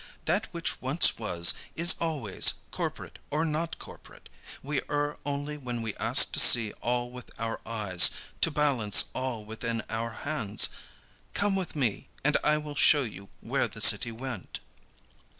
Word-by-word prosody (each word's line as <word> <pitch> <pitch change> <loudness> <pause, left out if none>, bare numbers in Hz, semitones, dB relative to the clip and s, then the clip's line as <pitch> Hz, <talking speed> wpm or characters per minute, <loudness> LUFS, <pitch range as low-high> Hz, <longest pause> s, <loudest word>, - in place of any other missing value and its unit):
That - - 0
which - - -4
once - - +3
was, 85 -1 +2 0.2
is 170 +2 +4
always, 145 - +2 0.2
corporate - - -6
or 155 +3 -1
not 160 +1 -3
corporate. - - -14 0.3
We 140 0 -2
err 145 0 -2
only 145 +1 -4
when 120 -4 -5
we 110 -2 -4
ask - - +5
to - - +2
see 110 -3 +7
all 120 0 -2
with 125 -1 -11
our 115 0 -4
eyes, 105 -6 +3 0.3
to - - +2
balance 140 -9 +3
all 120 -5 -5
within 115 +1 -4
our 115 +1 -3 0.2
hands. 110 -10 +1 0.7
Come 200 -1 +2
with 190 -4 -4
me, 125 -8 -2 0.2
and 150 +1 +1
I 150 0 +2
will 150 -1 -7
show 145 0 +4
you 100 -4 -9
where - - -1
the - - -12
city 115 - +5
went." 120 -3 -7
125 Hz, 155 wpm, -27 LUFS, 115-150 Hz, 0.7 s, see